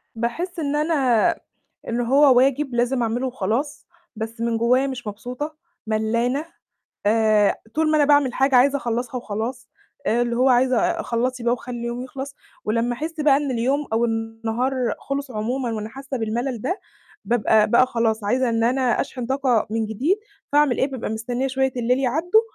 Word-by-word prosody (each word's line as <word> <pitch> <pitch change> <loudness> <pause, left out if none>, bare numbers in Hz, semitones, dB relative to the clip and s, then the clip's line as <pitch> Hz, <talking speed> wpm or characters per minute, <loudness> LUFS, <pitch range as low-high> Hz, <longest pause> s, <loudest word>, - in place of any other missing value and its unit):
باحس 330 +11 -3
إن 290 -1 -1
أنا 280 -7 +3 0.6
إن 235 +1 -1
هو 265 +2 +5
واجب 270 +1 +2
لازم 245 +1 +1
أعمله 235 +3 -1
وخلاص، 250 +4 -2 0.3
بس 225 +1 -6
من 230 0 0
جوايا 250 +4 +3
مش 255 -3 -6
مبسوطة، 250 +9 -5 0.3
ملّانة، 230 +6 0 0.6
آآ، 215 -1 +4 0.2
طول 315 0 +2
ما 310 - +3
أنا 295 - +4
باعمل 285 -3 +3
حاجة 270 0 +3
عايزة 275 +3 +5
أخلّصها 245 0 -3
وخلاص، 235 +3 -5 0.4
آآ، 235 +2 +2
اللي 235 -1 -1
هو 255 +2 +4
عايزة 255 0 +3
آآ، 335 +5 0
خلّصي 245 +1 -1
بقى 240 - +3
وخلّي 245 0 -7
اليوم 235 +1 -4
يخلص، 275 +2 -7 0.3
ولمّا 230 +3 0
أحس 315 +4 -5
بقى 290 -2 +5
إن 285 -2 -1
اليوم 260 +4 0
أو 225 +1 +2
النهار 225 +2 -2 0.3
خلص 275 -1 -4
عمومًا، 235 +2 -2
وأنا 215 0 -4
حاسة 270 +2 -6
بالملل 235 +2 -2
ده، 360 +10 -2 0.4
بابقى 220 -2 +3
بقى 255 +3 +5
خلاص 225 -3 0
عايزة 250 +5 +1
إن 230 0 +1
أنا 250 -1 +2
أشحن 250 -2 -4
طاقة 260 -3 +1
من 225 0 -1
جديد، 275 - 0 0.3
فأعمل 290 -4 +3
إيه؟ 265 - +3
بابقى 260 -5 -4
مستنية 240 +4 -2
شوية 265 0 0
الليل 245 +1 +1
يعدّوا 315 - +3
245 Hz, 170 wpm, -22 LUFS, 230-270 Hz, 0.6 s, هو